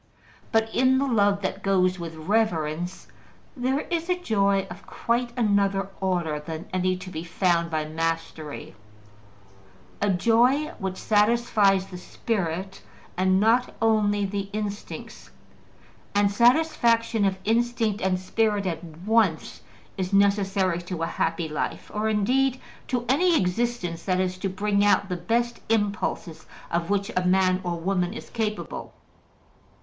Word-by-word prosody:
But 225 0 +1
in 260 +1 +4
the 275 - +1
love 205 -5 +2
that 190 +1 -3
goes 185 -2 +2
with 165 -1 -6
reverence 175 -2 -1 0.5
there 260 +2 0
is 335 0 -3
a 360 - +2
joy 200 - +1
of 180 +3 -11
quite 240 +1 -1
another 200 -3 +1
order 175 -5 -1
than 160 +2 -7
any 185 0 +1
to 185 0 -9
be 160 -1 -5
found 170 -1 +1
by 155 -1 -1
mastery, 160 -1 -4 1.3
a 205 - +2
joy 240 - +3
which 190 -2 -3
satisfies 210 -3 +3
the 180 -2 -9
spirit 190 -2 -3 0.3
and 185 +1 +3
not 230 +4 +2
only 210 -2 +2
the 195 0 -3
instincts; 210 -1 -6 0.9
and 205 0 +3
satisfaction 235 -2 +3
of 195 -1 +1
instinct 225 -1 +1
and 185 -1 +1
spirit 205 +2 0
at 170 -2 -3
once 175 +2 0 0.4
is 185 0 -2
necessary 195 -3 +2
to 175 -1 -5
a - - +2
happy 165 0 -1
life, 150 -1 -4
or 215 +1 0
indeed 255 +5 +1 0.3
to 245 -2 -1
any 335 +6 +3
existence 180 -3 -1
that 185 -1 +1
is 185 0 -1
to 195 - -1
bring 200 +2 +1
out 205 -1 +3
the 180 - -1
best 235 +7 -1
impulses 205 -6 -1 0.2
of 170 0 -1
which 200 +2 0
a 185 - +1
man 185 0 +3
or 175 -2 -3
woman 180 +2 -1
is - - -9
capable. 215 -2 -4
200 Hz, 140 wpm, -25 LUFS, 180-225 Hz, 1.3 s, in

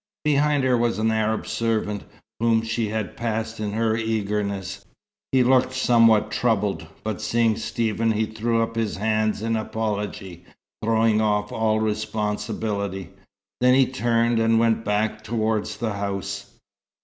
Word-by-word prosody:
Behind 145 -1 +3
her 130 -1 +3
was 120 -1 +1
an 110 +1 +1
Arab 110 0 0
servant, 110 -3 -1 0.3
whom 115 -1 +2
she 110 -1 -1
had 110 -3 -3
passed 115 -2 -3
in 105 -1 -3
her 110 0 +1
eagerness. 105 -3 -2 0.5
He 130 -1 +4
looked 130 +1 +3
somewhat 115 -4 +4
troubled, 105 -8 0 0.2
but 110 -1 -3
seeing 115 0 +2
Stephen 115 0 0
he 110 +1 +1
threw 115 +1 0
up 115 0 -5
his 115 -2 -1
hands 110 0 0
in 115 0 0
apology, 105 -5 -4 0.4
throwing 110 -1 +3
off 105 -1 0
all 110 -1 +1
responsibility. 105 -3 -2 0.5
Then 125 +1 +5
he 135 0 +5
turned 120 -2 +1
and 115 0 +3
went 115 -1 +2
back 105 +1 -1
towards 110 -1 -1
the 115 -3 -2
house. 100 0 -4
110 Hz, 140 wpm, -24 LUFS, 105-115 Hz, 0.5 s, Then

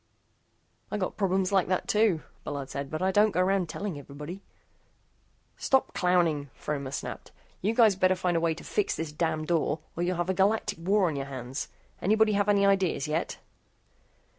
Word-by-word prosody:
"I - - -2
got 185 -3 -2
problems 190 -1 +1
like 190 -3 +3
that, 185 0 -1
too," 210 -7 +2 0.2
Bullard 140 -2 -5
said, 140 0 -4
"but 155 +4 -3
I 190 - +3
don't 210 +3 +5
go 190 - -2
around 185 -2 +1
telling 185 -2 -4
everybody." 150 +7 -8 1.2
"Stop 265 -1 +1
clowning," 170 -6 +2
Fromer 140 -3 -4
snapped, 140 - -6 0.3
"you 215 +4 0
guys 225 -5 +6
better 185 0 +3
find 180 -1 0
a - - +3
way 165 -1 +1
to - - -11
fix 210 - 0
this 160 -2 -4
damn 155 0 -1
door 160 -2 +1 0.2
or 170 - -3
you'll 180 0 0
have 175 +2 0
a - - 0
galactic 195 0 +1
war 195 +3 +3
on 160 -4 0
your 140 0 -3
hands. 130 0 -5 0.3
Anybody 215 +3 +3
have 205 0 +1
any 200 -1 +4
ideas 190 -7 +2
yet?" 155 +3 -2
180 Hz, 185 wpm, -28 LUFS, 155-195 Hz, 1.2 s, guys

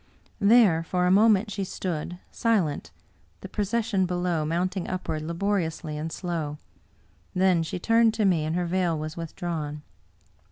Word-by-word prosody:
There 200 -6 +5
for 180 +2 0
a 180 - +3
moment 210 +1 +4
she 200 -1 -2
stood, 175 -2 -4
silent, 175 - 0 0.5
the - - -7
procession 210 -2 0
be 180 - -2
low 175 -3 0
mounting 180 +4 -1
upward 165 -4 -3
laboriously 170 -2 -2
and 155 +2 -4
slow; 160 -5 -3 0.8
then 185 -2 +3
she 165 +3 -3
turned 225 +3 +3
to 220 -2 +1
me, 175 -5 +3
and 155 +2 -1
her 180 0 0
veil 175 -2 0
was 155 +1 -5
withdrawn. 160 -3 -4
180 Hz, 150 wpm, -26 LUFS, 160-200 Hz, 0.8 s, There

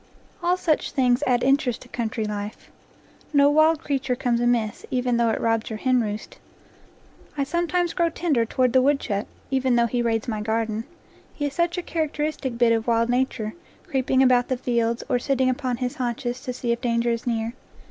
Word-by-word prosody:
All 350 +1 +2
such 320 -4 0
things 255 -3 +2
add 245 -1 +2
interest 270 -3 +2
to - - -16
country 230 -2 -3
life. 210 0 -6 0.6
No 285 0 +5
wild 310 +1 +4
creature 270 -3 -1
comes 245 -2 0
amiss, 235 -3 0
even 250 -2 0
though 235 -1 +3
it - - 0
rob 225 0 +1
your 220 - -4
henroost. 220 -4 -1 1.0
I 280 - +1
sometimes 345 +3 0
grow 340 -1 +2
tender 315 -7 +1
toward 250 +1 +1
the 260 - +6
wood 280 +1 +3
chuck, 200 -4 -3 0.2
even 260 -2 +2
though 235 0 +4
he 240 +1 -1
raids 225 -2 0
my 215 -3 -2
garden; 220 0 -1 0.5
he 290 - -2
is 285 - -2
such 345 +3 0
a 360 - -2
characteristic 300 -6 -2
bit 240 -1 +4
of 225 0 -1
wild 230 0 +2
nature, 245 -3 0 0.3
creeping 265 -5 +2
about 250 -1 +4
the 260 - -1
fields, 235 -1 0
or 250 -3 +1
sitting 260 0 +1
upon 255 -2 -2
his 250 +3 -3
haunches 245 0 -3
to 250 - -4
see 245 -1 -2
if 235 0 -1
danger 235 0 +1
is 230 +1 -3
near. 230 -1 -1
245 Hz, 190 wpm, -24 LUFS, 230-275 Hz, 1.0 s, the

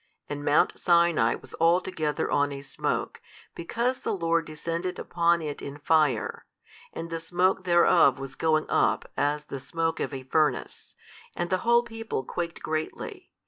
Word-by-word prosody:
And 145 0 -5
mount 145 +1 +2
Sinai 170 -9 +3
was - - -13
altogether 165 -3 +1
on 145 0 +2
a 140 0 -6
smoke, 135 - -3 0.3
because 235 +9 -2
the - - -2
Lord 165 -2 +1
descended 165 +3 -4
upon 170 -1 +1
it 150 -2 -5
in 140 +1 -7
fire, 150 -6 +1 0.4
and 165 0 -7
the 165 - -2
smoke 180 +3 +1
thereof 170 -5 +5
was 135 0 -7
going 155 +1 +1
up - - +1
as 145 +1 0
the 140 -2 -7
smoke 165 +4 -2
of - - -2
a 135 -2 -6
furnace, 150 +3 -1 0.4
and 175 +1 -3
the 185 - +2
whole 235 +2 +4
people 225 - -4
quaked 170 +5 -5
greatly. 255 - -4
165 Hz, 155 wpm, -27 LUFS, 145-175 Hz, 0.4 s, thereof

